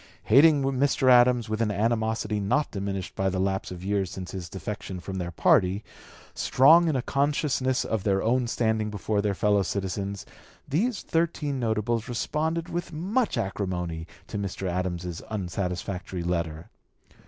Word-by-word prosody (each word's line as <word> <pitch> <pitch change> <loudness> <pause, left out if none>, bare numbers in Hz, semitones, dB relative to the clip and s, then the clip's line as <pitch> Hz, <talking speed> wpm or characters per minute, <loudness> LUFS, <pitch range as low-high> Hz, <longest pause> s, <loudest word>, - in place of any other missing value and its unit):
Hating 145 +4 +6
Mr. 135 -1 +2
Adams 120 -1 +5
with 110 +1 -2
an 110 - +2
animosity 110 0 0
not 105 +10 0
diminished 100 -2 -4
by 95 0 +1
the 95 - -2
lapse 95 0 -1
of 90 -1 -8
years 100 -1 0
since 90 -1 -7
his 90 -3 -6
defection 95 0 -6
from 95 +1 -5
their 85 -1 -3
party, 90 +4 +3 0.5
strong 160 +6 +5
in 155 - +1
a 130 - 0
consciousness 140 -2 0
of 110 -4 -2
their 95 -1 +1
own 120 +2 +2
standing 110 -2 0
before 105 0 -1
their 100 -1 0
fellow 105 +1 +3
citizens, 100 +1 -3 0.4
the 165 - +1
thirteen 165 - -1
notables 115 0 -1
responded 160 +7 -1
with 175 -1 -4
much 195 +9 0
acrimony 90 -4 -3 0.2
to 105 - -5
Mr. 95 -1 -4
Adams's 90 -1 -3
unsatisfactory 95 -2 -3
letter. 85 -2 -3
105 Hz, 150 wpm, -26 LUFS, 95-130 Hz, 0.5 s, Hating